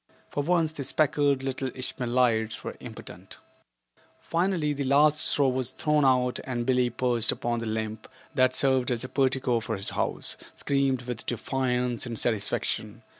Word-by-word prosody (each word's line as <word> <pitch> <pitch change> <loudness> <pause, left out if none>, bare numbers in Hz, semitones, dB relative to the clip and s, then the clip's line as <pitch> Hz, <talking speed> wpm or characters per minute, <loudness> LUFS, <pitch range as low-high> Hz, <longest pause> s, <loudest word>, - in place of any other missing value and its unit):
For 145 - -1
once 165 0 +2
the 150 -3 -5
speckled 145 -1 +2
little 135 0 -2
Ishmaelites 120 -3 0
were - - -5
impotent. - - -10 0.8
Finally 170 -3 0
the 140 0 -3
last 145 +3 +4
straw 140 -2 +3
was 130 -1 -1
thrown 150 +2 +1
out 125 -1 +3
and 120 -2 -3
Billie 125 -1 +2
perched 120 -1 +1
upon 120 0 -2
the 115 - -4
limb 110 0 -2 0.3
that 130 -2 +3
served 130 -2 +2
as 120 -2 -1
a - - -4
portico 130 -3 +1
for 110 0 -3
his 100 0 -2
house, - - -2 0.2
screamed 135 -2 0
with 120 -2 -6
defiance 125 0 -1
and 115 -2 -5
satisfaction. 110 -3 -2
130 Hz, 155 wpm, -27 LUFS, 120-140 Hz, 0.8 s, last